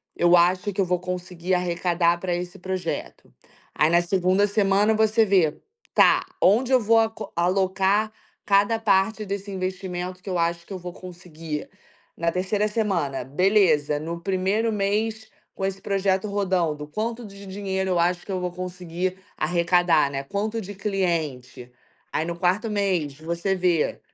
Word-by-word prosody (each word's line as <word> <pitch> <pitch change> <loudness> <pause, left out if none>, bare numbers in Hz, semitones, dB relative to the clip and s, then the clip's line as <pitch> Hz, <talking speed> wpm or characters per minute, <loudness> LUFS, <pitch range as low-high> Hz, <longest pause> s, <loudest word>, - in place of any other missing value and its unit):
eu 175 0 +5
acho 185 +4 +2
que 195 - -7
eu - - +2
vou 180 0 0
conseguir 180 0 -4
arrecadar 175 -1 +1
pra 180 0 -2
esse 175 0 -5
projeto". 185 -2 -5 0.4
Aí, 150 +2 +3
na 170 +1 +4
2ª 185 +2 +2
semana, 205 +1 +3
você 220 +1 +3
vê: 185 -7 +2 0.4
"Tá, - - +5 0.2
onde 235 +7 +4
eu 260 - +6
vou 225 +2 +4
ac 225 0 +1 0.2
alocar 190 +4 +1 0.3
cada 200 +3 +3
parte 210 0 +2
desse 200 0 -5
investimento 185 -1 -4
que 195 - -8
eu 180 - -1
acho 170 0 -1
que - - -7
eu - - -4
vou 180 -1 -8
conseguir?". 165 -4 -7 0.5
Na 170 0 0
3ª 190 +4 0
semana: 190 - -1
"Beleza, 150 - +2
no 170 +2 -5
primeiro 195 +5 0
mês 215 +2 -1 0.3
com 190 - -2
esse 195 0 -3
projeto 195 0 0
rodando, 180 -7 0
quanto 225 +8 -4
de 200 -1 -11
dinheiro 190 -1 -2
eu 175 - +2
acho 175 +1 +1
que 200 - -6
eu 185 - -1
vou 180 0 -3
conseguir 180 0 -4 0.2
arrecadar, 170 -2 +2
né, 135 - -3
quanto 210 +8 -3
de 205 +1 -8
cliente?". 165 - -2 0.4
Aí, 155 - 0
no 170 0 -3
4º 185 +5 +1
mês, 185 -9 -1
você 170 +4 -1
vê: 175 -4 +1
185 Hz, 160 wpm, -24 LUFS, 170-200 Hz, 0.5 s, eu